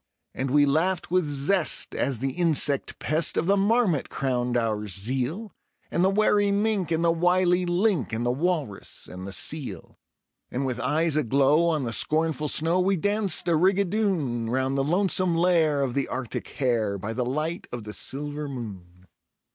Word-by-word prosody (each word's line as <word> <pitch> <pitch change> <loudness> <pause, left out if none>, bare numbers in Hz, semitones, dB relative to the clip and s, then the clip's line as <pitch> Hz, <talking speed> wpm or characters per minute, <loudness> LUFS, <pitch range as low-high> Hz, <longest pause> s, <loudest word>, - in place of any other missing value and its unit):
And 135 0 -3
we 145 +2 +4
laughed 165 +6 0
with 180 -3 +2
zest 145 +5 +1
as 135 -3 0
the 135 +4 -1
insect 150 -3 +1
pest 155 +1 0
of - - +1
the 195 +3 +3
marmot 200 - +1
crowned 125 -2 -1
our 110 -3 -1
zeal, 130 - -1 0.4
And 170 - +1
the 190 - +4
wary 205 0 +2
mink 205 -3 0
and 165 +1 +1
the 165 - +4
wily 180 +1 +2
"link", 175 - +1
and 115 +2 -2
the 120 - +1
walrus 145 - -3
and 90 +1 -9
the - - -6
seal. 105 - -3 0.5
And 135 +2 -3
with 125 -2 -2
eyes 160 +2 0
aglow 140 +4 +3
on 155 -4 0
the 115 -2 -1
scornful 155 +1 +1
snow 165 +4 +1
we 190 +2 +2
danced 205 -1 0
a 170 - +3
rigadoon, 180 - 0
Round 130 +2 -1
the 135 - +1
lonesome 180 +2 +2
lair 165 -4 +2
of 130 -3 -2
the 140 +1 -1
Arctic 125 -2 -5
hare, 115 -7 -1
by 100 +4 -5
the 125 - -1
light 155 +7 -3
of 120 -2 -6
the 105 0 -7
silver 145 +6 -2
moon. 95 -8 -9
150 Hz, 170 wpm, -25 LUFS, 125-180 Hz, 0.5 s, we